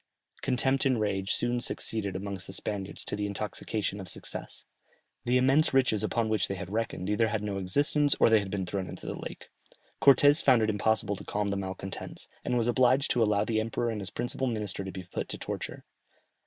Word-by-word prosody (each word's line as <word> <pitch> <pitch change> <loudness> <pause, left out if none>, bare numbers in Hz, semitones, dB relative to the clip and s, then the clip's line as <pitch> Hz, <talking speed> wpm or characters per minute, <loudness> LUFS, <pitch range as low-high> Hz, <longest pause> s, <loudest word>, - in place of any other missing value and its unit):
Contempt 130 +1 +1
and 130 -4 +2
rage 100 -2 -1
soon 120 0 +1
succeeded 110 -4 -2
amongst 95 -1 -4
the 95 - -7
Spaniards 100 0 -4
to - - -3
the 105 0 -2
intoxication 105 0 -3
of 95 - -7
success; - - -6 0.6
the 125 +1 +3
immense 135 +3 +3
riches 125 -6 +3
upon 115 +1 0
which 110 -3 +1
they 95 - -3
had 95 -1 -7
reckoned 110 -4 -2
either 105 +2 +2
had 110 -1 -2
no 100 -2 -2
existence, 145 +9 +2
or - - +6
they 110 -1 +6
had 100 -1 -4
been 95 -1 -2
thrown 95 +1 -3
into - - -9
the - - -3
lake. - - -8 0.5
Cortès 145 +3 +7
found 125 -5 +5
it 110 - +2
impossible 105 -1 +1
to - - -9
calm 105 0 -1
the 100 - -1
malcontents, 95 0 -5 0.2
and 125 - 0
was 115 - +2
obliged 130 +3 +3
to 120 - +2
allow 105 -1 +3
the 110 0 +1
emperor 115 +1 -1
and 105 -2 -4
his 95 - -4
principal 120 +2 -2
minister 105 -5 -2
to 95 - -5
be 95 - -7
put 90 - -5
to - - -3
the - - -26
torture. - - -5
110 Hz, 210 wpm, -29 LUFS, 100-120 Hz, 0.6 s, Cortès